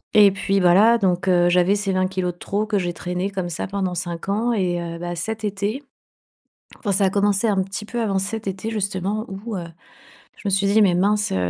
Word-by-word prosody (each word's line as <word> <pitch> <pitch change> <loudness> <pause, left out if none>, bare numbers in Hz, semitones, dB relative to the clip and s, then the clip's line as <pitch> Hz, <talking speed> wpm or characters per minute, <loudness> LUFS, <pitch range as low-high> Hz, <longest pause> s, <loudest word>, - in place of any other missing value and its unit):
Et 205 -2 +8
puis 195 0 0
bah 175 -1 +5
là, 225 +5 +6
donc 185 -2 0
heu, 175 -1 +4
j'avais 180 +3 +3
ces 200 -1 -1
20 185 0 +1
kilogrammes 185 -1 -2
de - - -27
trop 205 +2 -2
que 210 -2 0
j'ai 175 -1 -2
traîné 180 +3 -3
comme 185 -3 -4
ça 165 - -4
pendant 190 -2 -2
5 175 0 -5
ans 225 +4 +1
et 180 -4 0
heu, 170 0 -5
bah, 175 0 -4
cet 220 +6 -4
été, 205 +6 -2 0.9
enfin, 205 - -2
ça 195 +1 +3
a - - +3
commencé 200 +2 +1
un 195 -3 +2
petit 195 +2 -6
peu 235 +2 -3
avant 195 -3 0
cet 210 +3 -4
été 195 +3 -3
justement 200 0 -2
où, 200 +3 -6
heu, 175 - -4 0.7
je - - -15
me - - +1
suis 195 +1 +2
dit: 215 +2 +4
«Mais 180 -3 +4
mince, 205 +3 +1
heu, - - 0
195 Hz, 235 wpm, -22 LUFS, 180-210 Hz, 0.9 s, Et